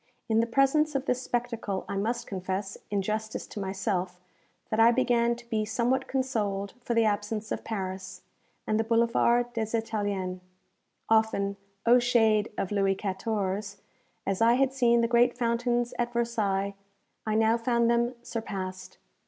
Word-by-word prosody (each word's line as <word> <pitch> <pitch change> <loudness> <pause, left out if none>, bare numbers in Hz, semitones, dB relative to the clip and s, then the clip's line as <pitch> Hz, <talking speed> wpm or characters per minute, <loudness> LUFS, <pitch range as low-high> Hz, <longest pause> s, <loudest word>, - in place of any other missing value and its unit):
In 220 -1 +2
the 230 - +2
presence 275 +5 +2
of 275 0 -1
this 250 -1 0
spectacle 235 -6 -3
I - - -4
must 235 +4 -1
confess, 190 +1 -4
in 200 -2 0
justice 215 +2 -3
to - - -8
myself, 190 -2 -2 0.5
that 220 - 0
I 230 +1 +7
began 240 -1 +2
to 235 0 -14
be 220 -2 0
somewhat 245 +4 0
consoled 210 -7 -1
for 240 -1 -2
the 230 -1 +4
absence 210 +1 -1
of - - -3
Paris, 190 -3 -5 0.4
and 215 0 +1
the - - +2
Boulevard 235 +1 +2
des 225 0 -1
Italiens. 205 -5 -2 0.7
Often, 220 -3 +2 0.3
O 240 +2 +7
shade 225 -3 +3
of 195 - -2
Louis 195 -1 +2
XIV.! 200 0 -2 0.5
as 195 +2 -1
I 230 +1 +6
had 270 0 +2
seen 235 -3 +3
the 230 - +2
great 240 +1 +3
fountains 240 0 0
at 240 0 -1
Versailles, 205 -5 0 0.5
I 215 - +1
now 220 +1 +4
found 235 0 +1
them 235 +1 +2
surpassed. 190 -6 -5
225 Hz, 155 wpm, -28 LUFS, 200-235 Hz, 0.7 s, I